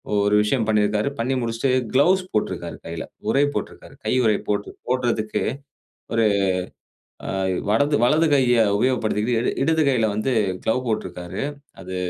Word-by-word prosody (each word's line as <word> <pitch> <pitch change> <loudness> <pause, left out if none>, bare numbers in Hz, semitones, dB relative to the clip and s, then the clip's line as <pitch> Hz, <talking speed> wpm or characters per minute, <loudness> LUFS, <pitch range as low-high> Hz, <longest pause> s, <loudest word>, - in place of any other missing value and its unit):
ஒரு 100 0 +3
விஷயம் 115 +1 0
பண்ணியிருக்கிறாரு. 105 +2 +1
பண்ணி 125 +3 0
முடிச்சுட்டு 115 +3 -1 0.2
கிளவ்ஸ் 185 +8 +4
போட்டிருக்காரு 105 - -2
கையில 85 -1 -5 0.3
உறை 140 - +3
போட்டிருக்கிறாரு. - - -6
கை - - +1
உறை 105 -2 +3
போட்டு 105 0 -1 0.2
போடுறதுக்கு, 120 -4 0 0.7
ஒரு 115 -1 +3 1.0
அ - - -2 0.4
வடது 145 +6 +3
வலது 155 +6 +3
கையை 125 -4 +4
உபயோகப்படுத்திக்கிட்டு, 115 -1 +1
இட - - -1
இடது 160 +2 +2
கையில 120 -5 +2
வந்து 110 +5 -1 0.3
க்ளோவ் 125 +3 0
போட்டிருக்கிறாரு. 90 -4 -4 0.4
அது 95 +1 -6
115 Hz, 135 wpm, -22 LUFS, 105-130 Hz, 1.0 s, கிளவ்ஸ்